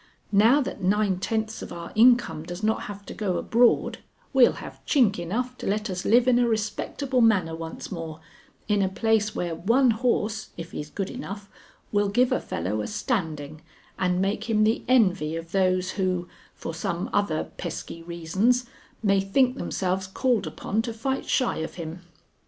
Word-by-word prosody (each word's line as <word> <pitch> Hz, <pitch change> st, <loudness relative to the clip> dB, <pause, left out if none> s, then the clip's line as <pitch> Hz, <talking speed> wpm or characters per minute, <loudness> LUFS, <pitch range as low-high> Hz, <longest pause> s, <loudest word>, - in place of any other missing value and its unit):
Now 225 Hz, +8 st, +5 dB
that 250 Hz, -, -5 dB
nine 195 Hz, 0 st, +2 dB
tenths 220 Hz, +2 st, -2 dB
of -, -, -7 dB
our 170 Hz, 0 st, -7 dB
income 235 Hz, -9 st, +4 dB
does 175 Hz, +5 st, -7 dB
not 220 Hz, +1 st, +1 dB
have 200 Hz, 0 st, -8 dB
to -, -, -7 dB
go 195 Hz, -4 st, -1 dB
abroad, 235 Hz, +1 st, +3 dB, 0.3 s
we'll 260 Hz, -2 st, +6 dB
have -, -, -10 dB
chink 235 Hz, -, +3 dB
enough 240 Hz, +9 st, -2 dB
to -, -, -5 dB
let 210 Hz, +1 st, -1 dB
us 180 Hz, 0 st, -4 dB
live 240 Hz, +3 st, +5 dB
in 245 Hz, -1 st, +5 dB
a 245 Hz, -, +3 dB
respectable 235 Hz, +4 st, -1 dB
manner 195 Hz, -8 st, +3 dB
once 165 Hz, 0 st, -7 dB
more 165 Hz, -3 st, -6 dB, 0.5 s
in 210 Hz, -1 st, +2 dB
a 190 Hz, -, +2 dB
place 215 Hz, +1 st, +1 dB
where 175 Hz, -1 st, -2 dB
one 235 Hz, +10 st, +3 dB
horse, 220 Hz, -2 st, 0 dB
if 165 Hz, 0 st, -7 dB
he's 150 Hz, -, -6 dB
good 195 Hz, +4 st, -4 dB
enough, 205 Hz, -6 st, -7 dB, 0.4 s
will 205 Hz, -1 st, +2 dB
give 245 Hz, +5 st, +3 dB
a -, -, +2 dB
fellow 95 Hz, +6 st, -3 dB
a -, -, -3 dB
standing 155 Hz, -, -3 dB, 0.4 s
and 180 Hz, -1 st, +1 dB
make 200 Hz, +4 st, -1 dB
him 215 Hz, -1 st, +3 dB
the 220 Hz, +2 st, +2 dB
envy 185 Hz, -11 st, +3 dB
of 165 Hz, 0 st, -6 dB
those 185 Hz, -1 st, +2 dB
who, 185 Hz, -2 st, -1 dB, 0.3 s
for 165 Hz, -, -6 dB
some 175 Hz, +1 st, -2 dB
other 185 Hz, -7 st, +1 dB
pesky 165 Hz, -, -6 dB
reasons, 175 Hz, +9 st, 0 dB, 0.4 s
may 195 Hz, -2 st, +3 dB
think 250 Hz, +6 st, +2 dB
themselves 190 Hz, -5 st, -2 dB
called 230 Hz, +1 st, 0 dB
upon 215 Hz, +3 st, -2 dB
to 230 Hz, 0 st, -4 dB
fight 265 Hz, +4 st, -2 dB
shy 255 Hz, -, +1 dB
of 160 Hz, 0 st, -4 dB
him. 170 Hz, 0 st, -6 dB
200 Hz, 175 wpm, -26 LUFS, 175-230 Hz, 0.5 s, we'll